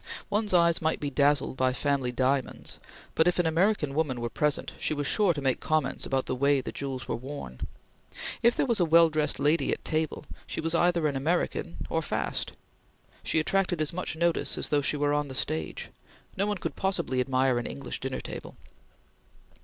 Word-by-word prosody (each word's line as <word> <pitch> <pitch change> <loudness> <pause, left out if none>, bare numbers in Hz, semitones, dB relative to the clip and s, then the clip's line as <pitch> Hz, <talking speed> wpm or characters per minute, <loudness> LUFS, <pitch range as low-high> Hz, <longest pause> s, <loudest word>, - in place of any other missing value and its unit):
One's 210 0 +1
eyes 170 -2 +4
might 160 0 0
be 145 -1 -3
dazzled 145 0 +2
by 130 0 +2
family 135 -2 0
diamonds, 130 +1 -1 0.3
but, 160 - +3
if 180 - +2
an 175 - +2
American 165 -2 +2
woman 145 -5 0
were 120 -1 -3
present, 150 +3 0
she 155 - -1
was 145 0 -2
sure 205 +4 +3
to 145 -4 -4
make 130 -2 +1
comments 155 -3 0
about 135 -1 0
the - - -2
way 140 +2 +3
the - - -5
jewels 130 -5 -5
were - - -1
worn. 125 - -7 0.7
If 235 +1 +4
there - - +1
was 235 -5 +1
a - - +4
well 165 0 +6
dressed 155 -1 0
lady 155 +3 +2
at - - -3
table, 155 -1 -1 0.2
she - - -4
was 165 +1 0
either 170 -1 +3
an 145 -2 +1
American 170 +4 -1
or 165 - 0
"fast." - - -2 0.7
She - - 0
attracted 180 +1 +1
as 155 0 0
much 180 -2 -3
notice 170 +1 0
as - - -1
though 145 -1 +3
she 150 - +1
were 145 0 +1
on 145 0 0
the 130 - -7
stage. 80 -9 -2 0.5
No 200 +2 0
one 210 -1 -1
could - - -4
possibly 190 -9 0
admire 130 -1 +2
an 120 - -4
English 140 -2 -5
dinner 135 0 -3
table. - - -8
150 Hz, 200 wpm, -28 LUFS, 135-170 Hz, 0.7 s, well